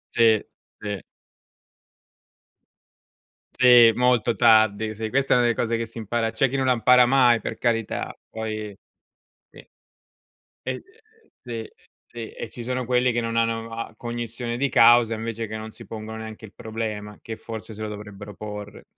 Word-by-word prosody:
Sì, 115 -2 +4 0.3
sì. 105 -4 -5 2.5
Sì, 120 -2 +7
molto 125 -2 +2
tardi. 110 -2 +4
Sì, 110 +1 -4
questa 135 0 +2
è - - +5
una 120 - +3
de 120 - +3
cose 115 0 -1
che 115 - -2
si 115 +1 -10
impara 115 +1 -1
c'è 120 +3 +1
chi 135 - -4
non 135 - 0
la 130 -1 +3
impara 125 +1 +6
mai, 125 -2 +4
per - - -6
carità, 115 -3 -1
poi 110 -2 -5 0.8
sì. - - -15 1.0
E 130 0 -4 0.6
sì, 115 -3 -6 0.4
sì, 115 -2 -8
e 115 - -7
ci 120 +2 -9
sono 125 0 -2
quelli 125 0 +2
che 120 - 0
non 115 0 -3
hanno 115 0 0
a 115 - -6
cognizione 120 0 -5
di 140 +2 0
causa 115 -1 +6
invece 115 0 -4
che 110 +1 -6
non 110 0 -8
si - - -12
pongono 110 0 -7
neanche 110 0 -8
il 105 - -18
problema, 110 -2 -5
che 110 -1 -7
forse 110 -1 -8
se 110 - -8
lo 110 - -3
dovrebbero 105 -1 -9
porre. 105 -1 -8
115 Hz, 165 wpm, -24 LUFS, 110-120 Hz, 2.5 s, Sì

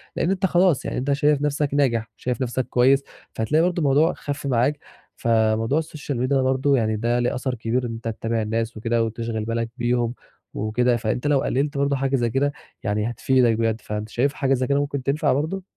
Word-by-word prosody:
لأن 175 - +1
أنت 190 0 0
خلاص، 175 -5 +3
يعني - - -3
أنت 135 +3 -1
شايف 145 0 +2
نَفسك 145 0 0
ناجح، 115 -6 +1
شايف 125 +1 -3
نَفسك 130 0 -1
كويس، 135 +3 +3 0.3
فهتلاقي 150 +9 +1
برضه 180 0 0
الموضوع 150 +2 +3
خَف 145 -1 -5
معاك. 135 +3 +1 0.4
فموضوع 115 +4 +2
السوشيال 155 -4 -5
ميديا 135 +2 +2
برضه 130 +2 +2
يعني 110 -2 +1
ده 120 +3 0
ليه 120 - 0
أثَر 130 0 -2
كبير 120 +2 -1
إن 115 - -4
أنت 115 0 -7
تتابع 115 0 -2
الناس 115 +1 -2
وكده 115 +1 0
وتشغِل 115 -1 -3
بالك 115 0 -2
بيهم 120 -1 0 0.4
وكده، 120 +3 +1
فأنت 120 +5 -2
لو 145 -2 +3
قلّلت 140 +3 -1
برضه 140 0 +1
حاجة 135 0 0
زي 120 -3 +1
كده 140 +4 0 0.3
يعني 105 +2 0
هتفيدك 120 0 +2
بجد، 115 0 0
فأنت 105 +1 -5
شايف 140 +6 0
حاجة 135 -2 +1
زي 130 -1 0
كده 140 0 +2
ممكن 140 -2 -2
تنفَع 145 +2 +1
برضه؟ 160 +7 -2
125 Hz, 200 wpm, -23 LUFS, 115-140 Hz, 0.4 s, خلاص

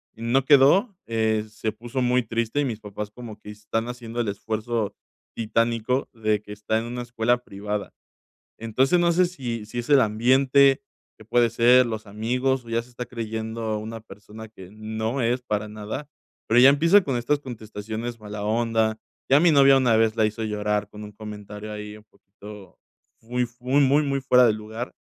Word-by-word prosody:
y 110 - -14
no 130 +3 +2
quedó, 150 - +5
eh, 110 -1 0
se 110 +1 -4
puso 120 +4 -5
muy 125 0 +2
triste 115 +4 -2
y - - 0
mis 115 -4 -4
papás 105 0 -7
como 110 -2 -10
que 105 - -12
están 105 +2 -4
haciendo 120 -1 -7
el 115 - -3
esfuerzo 110 +1 -3 0.4
titánico 115 +3 0
de 110 -2 0
que 105 - -13
está 105 +1 -1
en - - -4
una 120 +1 -5
escuela 120 0 0
privada. 105 +1 -5 0.7
Entonces, 130 +9 +2
no 170 0 +3
sé 180 +2 +4
si 120 -10 -5
si 120 - -7
es 120 - -9
el 140 - +7
ambiente 130 - +3 0.4
que 110 - -14
puede 120 +1 +3
ser, 120 +2 +5
los 110 -1 -5
amigos, 125 +5 -1
o 115 - -15
ya 115 0 0
se 125 - -19
está 120 0 -7
creyendo 110 -1 -5
a 110 -1 -1
una 115 +1 -7
persona 105 +1 -12
que 95 -4 -13
no 110 +4 -3
es 120 +2 +1
para 105 -2 -2
nada, 110 +7 -6 0.4
pero 120 +2 +5
ya 130 - +9
empieza 165 +8 +5
con 135 -3 -1
estas 140 +5 0
contestaciones 110 -1 -7
mala 105 -1 -6
onda. 110 0 0 0.3
Ya 140 - +7
a - - +1
mi 170 -2 +5
novia 135 -1 +6
una 120 -4 +3
vez 110 0 +2
la 110 - +3
hizo 110 +1 -4
llorar 105 -1 -1
con 105 0 -10
un 105 - -10
comentario 105 0 -9
ahí 105 0 -7
un 105 - -17
poquito 100 0 -14 0.4
fui 125 +2 -2
fu 120 +1 -25
muy, 140 +3 +3
muy, 140 +3 +4
muy 140 -1 -1
fuera 125 -1 +5
de 110 - +4
lugar, 110 +3 -6
115 Hz, 195 wpm, -24 LUFS, 105-125 Hz, 0.7 s, ya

